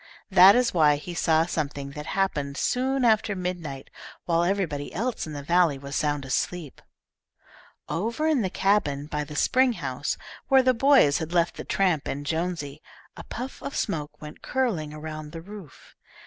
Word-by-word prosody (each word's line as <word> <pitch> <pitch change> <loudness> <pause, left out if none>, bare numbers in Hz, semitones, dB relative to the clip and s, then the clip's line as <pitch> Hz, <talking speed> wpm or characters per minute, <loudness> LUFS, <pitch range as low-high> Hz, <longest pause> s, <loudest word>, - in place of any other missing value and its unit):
That 190 +2 +8
is 250 -1 +2
why 150 -4 +5
he 160 +4 -7
saw 160 -1 +2
something 145 -4 -3
that 150 +2 -8
happened 150 -8 -1
soon 260 +1 0
after 215 -2 +3
midnight, 175 -7 -5 0.3
while 170 -1 +2
everybody 175 -6 -1
else 230 -1 -2
in 155 - -7
the 145 -1 -6
valley 170 -2 +3
was 140 0 -7
sound 145 -2 0
asleep. 150 +3 -3 1.1
Over 230 - -2
in 310 -5 +2
the 190 - -1
cabin 180 -8 +1
by 150 0 -3
the 150 +1 -9
spring 255 - +3
house 140 - -3 0.3
where 265 -1 +5
the 255 0 +4
boys 255 - +4
had 160 0 -5
left 170 -1 +2
the - - -6
tramp 180 -7 0
and 145 +1 -4
Jonesy, 160 -3 -3 0.3
a - - -9
puff 255 +3 -7
of 280 - -6
smoke 150 -5 -3
went 150 0 -10
curling 215 - -1
around 155 0 -7
the 165 - -7
roof. 195 -7 -12
165 Hz, 170 wpm, -26 LUFS, 150-205 Hz, 1.1 s, That